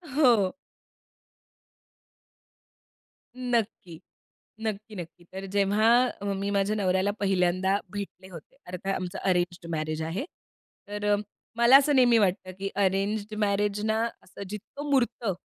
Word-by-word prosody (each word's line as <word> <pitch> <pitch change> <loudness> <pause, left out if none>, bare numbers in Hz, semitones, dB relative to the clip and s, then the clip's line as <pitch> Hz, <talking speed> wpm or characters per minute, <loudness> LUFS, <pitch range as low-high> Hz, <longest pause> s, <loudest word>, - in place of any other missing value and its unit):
हो. 235 -10 +4 2.8
नक्की, 230 -9 -2 0.6
नक्की, 215 0 -4
नक्की, 175 0 -9
तर 190 +1 -6
जेव्हा 205 +2 +3 0.5
मी 200 +1 -2
माझ्या 200 +1 +1
नवऱ्याला 190 0 +1
पहिल्यांदा 190 0 +2 0.2
भेटले 195 -2 -7
होते. 175 - -12
अर्थात 180 +2 -3
आमचं 180 -1 -4
अरेंज्ड 175 -2 0
मॅरेज 155 0 -2
आहे. 170 - -3 0.6
तर 205 0 -5
अ, 205 - +5 0.4
मला 235 +3 +8
असं 285 +1 +4
नेहमी 245 -3 +6
वाटतं, 185 -2 0
की 195 0 -2
अरेंज्ड 200 +2 0
मॅरेजना 210 +2 +1 0.2
असं 190 - -11
जितकं 255 +8 -7
मुरतं 240 -5 +1
200 Hz, 110 wpm, -27 LUFS, 185-220 Hz, 2.8 s, मला